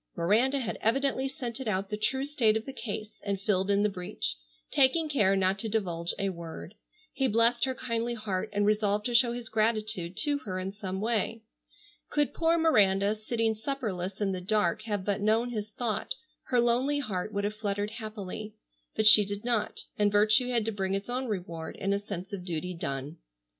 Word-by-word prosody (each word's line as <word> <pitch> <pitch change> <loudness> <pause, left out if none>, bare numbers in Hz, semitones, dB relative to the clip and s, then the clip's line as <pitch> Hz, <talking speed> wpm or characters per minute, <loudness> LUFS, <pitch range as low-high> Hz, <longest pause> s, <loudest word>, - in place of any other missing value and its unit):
Miranda 220 +11 +3
had 255 -5 -3
evidently 270 +3 +1
scented 250 -1 -5
out 195 -1 -1
the - - 0
true 265 +6 0
state 235 -7 +2
of 220 - -6
the 270 - -6
case 215 -3 -6
and 200 -1 -1
filled 195 -1 +1
in 200 0 +3
the - - +4
breach, 180 - -3 0.4
taking 295 +4 +4
care 210 -10 +3
not 190 0 +2
to 220 - -2
divulge 175 -6 -1
a 195 - 0
word. 170 0 -7 0.4
He 270 - +1
blest 235 +2 +3
her 260 -1 -2
kindly 235 -1 -2
heart 205 -4 -3
and 205 0 +1
resolved 210 0 +2
to 245 - 0
show 235 0 +5
his 240 -1 -6
gratitude 215 -5 0
to 290 -1 +1
her 185 -8 -5
in 185 +1 -3
some 195 -2 -5
way. 225 0 -1 0.7
Could 295 -1 +1
poor 335 0 +2
Miranda, 205 -11 +4
sitting 225 +1 0
supperless 210 -6 -3
in 205 -2 +1
the 185 -1 -3
dark, 195 -1 +1
have 205 -4 -2
but 200 -1 0
known 225 +3 +2
his 215 -2 -3
thought, 220 0 -2 0.3
her 250 - +2
lonely 245 +5 +2
heart 215 -8 -3
would 200 -1 -2
have 205 +1 -1
fluttered 205 -1 -2
happily. 215 -1 -6 0.4
But 220 - +1
she 215 0 +10
did 205 +2 -5
not, 230 -3 0 0.2
and 205 -1 +4
virtue 215 +4 +4
had 235 -3 +1
to 225 - 0
bring 195 -2 -1
its 195 +4 -4
own 255 +1 -2
reward 170 -6 -4
in 195 +1 -1
a 200 - +1
sense 200 -2 -7
of 190 -3 -4
duty 180 0 -3
done. 145 -1 -4
215 Hz, 195 wpm, -29 LUFS, 195-235 Hz, 0.7 s, she